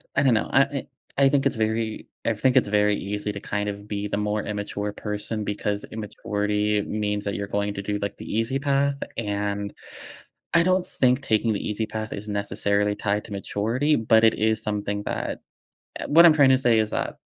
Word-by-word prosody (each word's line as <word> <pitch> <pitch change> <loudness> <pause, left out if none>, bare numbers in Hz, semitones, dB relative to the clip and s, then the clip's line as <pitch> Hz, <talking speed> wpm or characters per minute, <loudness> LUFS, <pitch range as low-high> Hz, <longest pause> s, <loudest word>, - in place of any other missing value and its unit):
I - - +3
don't 130 -3 +4
know, 110 - 0
I 135 - +6
I 140 -1 -5 0.3
I 135 0 +5
think 140 -1 +2
it's 140 - +2
very 110 0 -1 0.2
I 115 - +2
think 125 +4 +1
it's - - +4
very 105 0 +3
easy 105 +1 -3
to 100 - -6
kind 105 +1 -2
of 100 0 -7
be 105 -1 -3
the 100 - -2
more 105 0 0
immature 105 0 -4
person 105 +1 -4
because 105 0 -2
immaturity 105 -1 -1
means 105 -1 -2
that 100 - -2
you're 100 - -3
going 100 0 -1
to 100 - -4
do, 105 +1 -2
like, 100 0 -4
the - - -8
easy 115 +4 0
path, 140 0 +1
and 100 -2 -2 0.8
I 170 - +6
don't 185 0 +2
think 125 +1 +2
taking 110 -3 +1
the 100 - -3
easy 105 +1 -1
path 110 0 -5
is 100 +2 -7
necessarily 100 0 0
tied 105 0 -1
to - - -12
maturity, 115 +9 0
but 110 -1 +4
it 110 - +6
is 110 0 +1
something 105 -1 -2
that - - -3 0.6
Uh, - - -4
what 170 +1 +9
I'm 160 - +7
tryna 135 -3 +5
say 120 -4 +4
is 110 -1 +1
that - - -2
105 Hz, 205 wpm, -24 LUFS, 105-115 Hz, 0.8 s, what